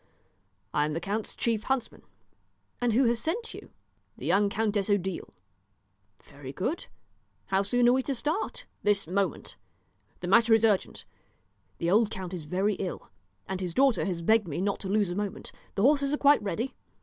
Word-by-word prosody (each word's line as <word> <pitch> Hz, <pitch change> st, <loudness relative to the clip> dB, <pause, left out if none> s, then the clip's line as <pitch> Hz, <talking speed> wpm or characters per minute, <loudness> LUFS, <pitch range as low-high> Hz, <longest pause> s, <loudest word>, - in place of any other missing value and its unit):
"I 145 Hz, -, +2 dB
am 150 Hz, -, -2 dB
the 165 Hz, -, -1 dB
count's 205 Hz, +5 st, -3 dB
chief 230 Hz, -3 st, 0 dB
huntsman." 265 Hz, -3 st, -2 dB, 0.8 s
"And 240 Hz, -2 st, +2 dB
who 255 Hz, +5 st, +4 dB
has 235 Hz, 0 st, +2 dB
sent 445 Hz, -, -3 dB
you?" -, -, -10 dB, 0.5 s
"The -, -, -8 dB
young 200 Hz, +1 st, +3 dB
Countess 210 Hz, -1 st, 0 dB
Odile." 190 Hz, -3 st, -1 dB, 0.9 s
"Very 140 Hz, -2 st, -10 dB
good. 245 Hz, -, -3 dB, 0.6 s
How 190 Hz, 0 st, +3 dB
soon 240 Hz, +5 st, +2 dB
are 245 Hz, -, +6 dB
we 260 Hz, -, +2 dB
to 275 Hz, +1 st, -2 dB
start?" 310 Hz, -, -2 dB, 0.2 s
"This 205 Hz, -1 st, +2 dB
moment. 185 Hz, 0 st, -2 dB, 0.6 s
The 175 Hz, -, -4 dB
matter 225 Hz, +3 st, +6 dB
is 225 Hz, 0 st, +3 dB
urgent; 205 Hz, -4 st, 0 dB, 0.7 s
the 170 Hz, +1 st, 0 dB
old 215 Hz, +2 st, +4 dB
count 190 Hz, -2 st, -6 dB
is 170 Hz, -4 st, -6 dB
very 190 Hz, +6 st, 0 dB
ill, 185 Hz, -3 st, -5 dB, 0.4 s
and 190 Hz, 0 st, -3 dB
his 180 Hz, -2 st, -3 dB
daughter 270 Hz, -2 st, +3 dB
has 175 Hz, -4 st, -3 dB
begged 220 Hz, +1 st, +3 dB
me 155 Hz, +1 st, -3 dB
not 200 Hz, +1 st, -1 dB
to 190 Hz, -, -5 dB
lose 205 Hz, -2 st, +1 dB
a -, -, -3 dB
moment. 205 Hz, 0 st, -4 dB, 0.2 s
The 195 Hz, -, 0 dB
horses 280 Hz, +1 st, +4 dB
are -, -, -5 dB
quite 285 Hz, -3 st, +5 dB
ready." 210 Hz, +6 st, -3 dB
205 Hz, 180 wpm, -28 LUFS, 185-240 Hz, 0.9 s, are